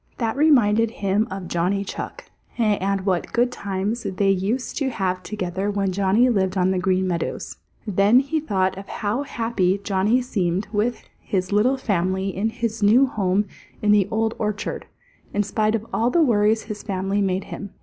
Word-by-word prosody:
That 225 -2 -1
reminded 230 -7 +4
him 205 0 0
of 190 -1 -6
Johnny 185 +4 0
Chuck - - -7 0.3
and 200 -4 +1
what 185 -3 0
good 245 +1 +2
times 200 +2 -3
they 195 0 +1
used 205 +7 -1
to 275 -2 0
have 185 -6 -2
together 190 0 -3
when 200 -2 0
Johnny 200 +6 +3
lived 195 -5 +1
on 185 0 +3
the 185 - 0
Green 185 0 +1
Meadows. 170 -2 -3 0.3
Then 205 +3 +4
he 280 +4 -1
thought 190 -10 0
of 195 - -10
how 215 +4 -2
happy 225 -8 0
Johnny 205 +5 +2
seemed 190 -5 -1
with 220 +3 0 0.2
his 185 -1 -2
little 230 +7 +3
family 190 -4 -1
in 210 +4 0
his 225 -1 -3
new 225 +7 +6
home 200 -4 0 0.4
in 210 - +4
the 205 -2 +4
Old 220 +1 0
Orchard, 210 -1 -3 0.5
in 205 - +2
spite 215 +1 0
of 220 -1 -3
all 230 +2 +2
the 330 +6 +3
worries 220 -4 +3
his 215 -1 -6
family 195 +1 -1
made 190 -1 0
him. 200 - -7
205 Hz, 175 wpm, -23 LUFS, 190-225 Hz, 0.5 s, new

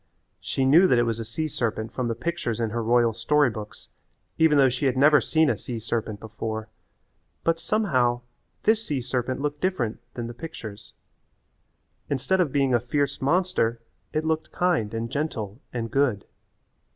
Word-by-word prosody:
She 135 - -1
knew 165 +8 +7
that 125 - +4
it 120 - +4
was 115 -1 -1
a - - -3
sea 120 +8 -3
serpent 115 -5 -2
from 125 -2 -1
the 115 - -1
pictures 120 -4 -2
in 115 -2 -1
her 115 +1 -1
royal 120 0 +3
story 130 +4 +2
books 105 -1 -9 0.5
even 160 -2 +5
though 135 -1 +6
she 130 +2 0
had 130 -1 0
never 150 +2 +6
seen 160 0 +2
a 120 - +2
sea 115 +4 -6
serpent 110 -2 -3
before, 110 0 -5 0.7
but 165 0 +1
somehow 130 - +1 0.4
this 220 +1 +3
sea 145 -10 -2
serpent 125 +1 -2
looked 145 0 -2
different 140 - -1 0.2
than 120 - -4
the 120 - -6
pictures. 110 -8 -9 1.2
Instead 165 +7 +1
of 160 -6 +1
being 135 -2 +2
a 120 - +4
fierce 140 +4 -1
monster 140 -6 +1 0.3
it 155 0 -1
looked 160 0 -1
kind 175 -13 +1
and 115 0 -3
gentle 120 -7 -3
and 115 -2 -4
good. 130 -8 +1
125 Hz, 175 wpm, -25 LUFS, 115-150 Hz, 1.2 s, knew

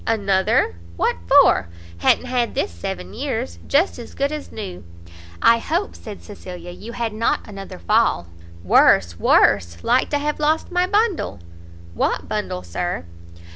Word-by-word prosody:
"Another! 195 - +2 0.2
what - - +1
for? - - +5 0.3
ha'n't 175 - +3
had 250 -2 -1
this - - -1
seven 90 +2 -6
years; 85 -1 -4
just 305 0 +2
as 235 - -10
good 280 +1 0
as 305 -1 -6
new." 195 -5 -7 0.6
"I 230 0 +6
hope," 340 - -2
said 210 -3 -10
Cecilia, 180 -4 -9
"you 215 +6 -9
had 230 -2 -3
not 225 +2 0
another 195 -3 -8
fall?" 220 - +2 0.4
"Worse, 85 -1 +4
worse; 85 -4 +3
like 245 +2 +2
to 290 - +1
have 295 +1 -2
lost 310 +3 +1
my 360 0 +2
bundle." 410 - 0 0.5
"What - - -1
bundle, 90 - -3
Sir?" 90 - -3
215 Hz, 145 wpm, -21 LUFS, -, 0.6 s, I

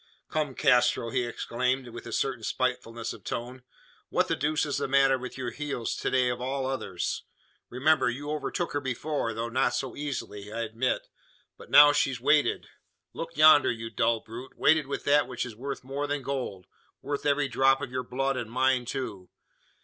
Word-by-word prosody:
"Come, 150 -4 -1
Castro!" 125 -4 +3
he 125 - 0
exclaimed, 125 +2 -2
with 120 0 -9
a - - -7
certain 120 -1 -1
spitefulness 115 -2 -2
of 110 -4 -13
tone. 125 +5 -5 0.5
"What - - +1
the - - +2
deuce 155 +2 0
is 145 -1 -2
the 140 - -1
matter 135 0 +4
with 130 +1 -7
your 125 -2 -3
heels 140 -3 -3
to - - -1
day 130 -1 +2
of 125 0 -3
all 135 +1 -2
others? 130 -9 -3 0.5
Remember, 140 +2 +3
you 145 +5 -4
overtook 155 +4 -2
her 145 - -1
before 130 -2 -2
though 115 +1 -2
not 125 0 +1
so 130 0 -3
easily, 115 -8 -5
I 115 +1 -3
admit. 115 +3 -1 0.5
But - - -14
now 145 0 +9
she's 135 -4 +1
weighted. 145 +4 +2 0.5
Look 165 -1 -7
yonder, 155 -1 +7
you 115 -1 -4
dull 115 0 +1
brute! 120 +4 -10
Weighted 155 -2 +4
with 140 - -4
that 145 +1 +4
which 125 -1 -3
is 115 -3 -8
worth 135 +4 -5
more 140 +3 -3
than 145 -1 -2
gold 125 -9 -4 0.4
worth 145 +1 -2
every 145 0 +2
drop 135 +1 +3
of - - -5
your 130 0 -2
blood, 135 +2 -1
and 120 -3 -4
mine 130 +1 +2
too. 115 -8 -5
130 Hz, 190 wpm, -28 LUFS, 120-140 Hz, 0.5 s, now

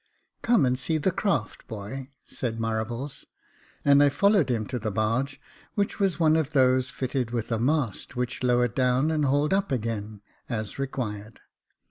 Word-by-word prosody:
" - - -49
Come 230 - +4
and 125 0 +1
see 160 +4 0
the 170 +5 +1
craft, 165 - -2
boy," 115 +6 -6 0.2
said 115 -3 -3
Marables; 115 +4 -3 0.6
and 140 0 +6
I 145 - +6
followed 200 +1 +3
him 115 -3 0
to 125 +1 -4
the 110 -1 -2
barge, 115 +7 -1 0.4
which 205 +1 -1
was 195 -4 +1
one 160 -1 +4
of 155 -2 0
those 130 -2 +4
fitted 130 -2 -2
with 120 -1 -3
a 115 - +1
mast 130 -3 -1
which 125 0 -2
lowered 125 -2 +2
down 130 +4 +2
and 155 -2 +1
hauled 145 +4 +2
up 195 -4 +1
again, 110 -4 -3 0.3
as 110 0 -4
required. 110 -6 -4
130 Hz, 170 wpm, -26 LUFS, 115-145 Hz, 0.6 s, and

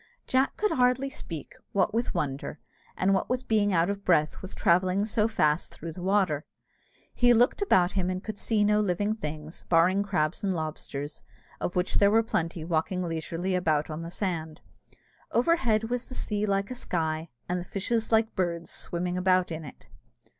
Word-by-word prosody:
Jack 260 +1 +1
could 425 0 +1
hardly 255 +2 +2
speak, 165 - -6 0.2
what 205 +1 +2
with 235 +1 -1
wonder, 140 +1 -2 0.4
and 190 +1 +3
what 190 - 0
with 250 +1 -2
being 210 -2 +3
out 170 -2 +3
of 200 0 -3
breath 155 -5 +2
with 190 - -8
travelling 185 +3 +3
so 215 0 +2
fast 155 -8 +1
through 165 +1 -6
the 175 - -9
water. 185 -6 +1 0.7
He 245 -1 +5
looked 245 - +3
about 185 - +4
him 185 -2 -1
and 185 0 -3
could 215 -2 -6
see 215 -2 +2
no 210 0 +3
living 205 +1 +1
things, 155 -5 -6
barring 180 +4 +4
crabs 180 -5 -1
and 190 -2 +1
lobsters, 155 -2 -5 0.4
of 175 - -3
which 180 0 0
there 200 - +6
were 225 +2 +4
plenty 165 -6 -2
walking 175 +2 0
leisurely 165 +2 -2
about 155 -4 +1
on 155 +2 -4
the 165 - -6
sand. 170 -4 -3 0.7
Overhead 235 -5 +2
was 245 +1 -2
the 255 - -6
sea 210 0 -1
like 195 +2 0
a - - -1
sky, 160 -6 -2 0.2
and 180 +1 -1
the 175 - -11
fishes 225 +3 -1
like 220 0 +3
birds 170 -2 -2
swimming 180 +1 -3
about 185 -1 +2
in 160 0 -4
it. 140 - -12
185 Hz, 180 wpm, -28 LUFS, 165-215 Hz, 0.7 s, there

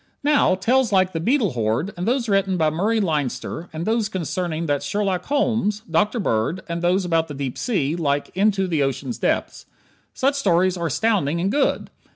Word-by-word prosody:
Now, 290 -9 +3
tales 245 +5 +2
like 185 -1 +3
"The 165 - -2
Beetle 225 - +1
Horde," 120 - -1
and 180 +3 -4
those 245 0 +1
written 195 -2 +1
by 155 -2 +2
Murray 210 +8 +1
Leinster, 160 - -2
and 160 +2 -5
those 220 -2 0
concerning 170 -2 -3
that 145 -3 0
Sherlock 195 -3 -1
Holmes, 225 -7 0
Dr. 210 +8 +1
Bird, 160 - -1
and 170 0 -3
those 180 +2 +2
about 165 -2 +1
the 145 - -7
deep 135 -2 -4
sea, 165 - -1
like 145 -4 -1
"Into 195 0 +2
the 165 -5 0
Ocean's 135 - -2
Depths," - - -1 0.5
such 275 +1 +2
stories 185 -8 +2
are 170 -2 -2
astounding, 170 - +1
and 190 +3 0
good. 285 +2 0
185 Hz, 185 wpm, -22 LUFS, 160-215 Hz, 0.5 s, Now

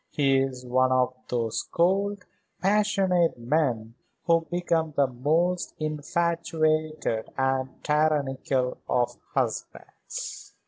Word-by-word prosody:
He 135 -2 +3
is 130 -1 -2
one 130 +1 +2
of 130 0 +2 0.2
those 115 -3 -1
cold, 195 +3 0 0.3
passionate 195 -4 +2
men 120 -3 0 0.3
who 165 -1 +3
become 165 -3 0
the 140 - +5
most 155 +8 0
infatuated 155 -3 0
and 135 0 -1
tyrannical 140 -4 +1
of 120 0 +1 0.2
husbands." - - -4
150 Hz, 95 wpm, -26 LUFS, 130-170 Hz, 0.3 s, the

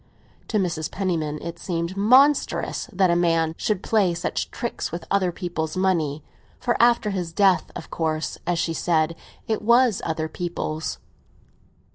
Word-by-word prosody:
To 215 - 0
Mrs. 170 -5 -1
Penniman 160 -6 -2
it 170 0 -6
seemed 170 0 -3
monstrous 255 +6 +3
that 190 -2 +3
a - - +3
man 165 -2 +2
should 205 0 -1
play 195 -6 +2
such 170 - -2
tricks 235 -2 -4
with 170 - -5
other 190 -3 +2
people's 170 -2 -4
money; 160 -6 0 0.4
for 245 -1 0
after 235 -3 +4
his 180 -4 -3
death, 190 +1 +3
of - - -8
course, 160 -1 -2
as 175 - +1
she 165 0 0
said, 165 0 +1 0.3
it 220 -1 -1
was 235 0 +4
other 160 -1 -2
people's. 160 -2 -4
175 Hz, 150 wpm, -24 LUFS, 165-200 Hz, 0.4 s, after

